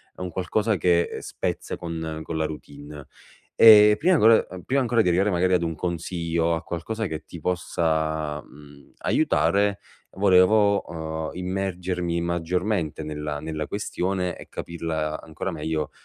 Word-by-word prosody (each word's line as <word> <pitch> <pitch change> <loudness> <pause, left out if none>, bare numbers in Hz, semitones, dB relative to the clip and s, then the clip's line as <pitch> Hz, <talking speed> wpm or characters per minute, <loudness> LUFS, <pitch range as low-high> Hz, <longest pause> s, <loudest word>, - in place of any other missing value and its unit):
è - - -11
un 90 - -3
qualcosa 100 +5 0
che 85 +1 +1
spezza - - -4
con 80 -2 -5
con 80 0 -4
la 80 - 0
routine 75 -1 -9 0.5
e 105 -1 +9
prima 175 +2 +3
vo - - +3 0.2
uhm, 95 - -8
prima 135 +1 +1
ancora 120 -2 +2
di - - 0
arrivare 95 +4 +2
magari 90 0 +1
ad 90 - +3
un 80 -1 -2
consiglio, 85 -1 -1
a 80 - -4
qualcosa 110 +7 -4
che 80 -2 -6
ti 85 - -10
possa, 80 -3 -1
mhmm, 70 -1 -17
aiutare, 100 0 +2 0.3
volevo, 100 +2 +4
uhm, 80 -1 -4
immergermi 90 -2 -2
maggiormente 85 0 -1
nella 75 -1 -4
nella 80 0 -4
questione 95 -3 -2
e - - -12
capirla 80 -2 -4
ancora 85 +4 -5
meglio, 80 -1 -3
85 Hz, 145 wpm, -24 LUFS, 80-95 Hz, 0.5 s, e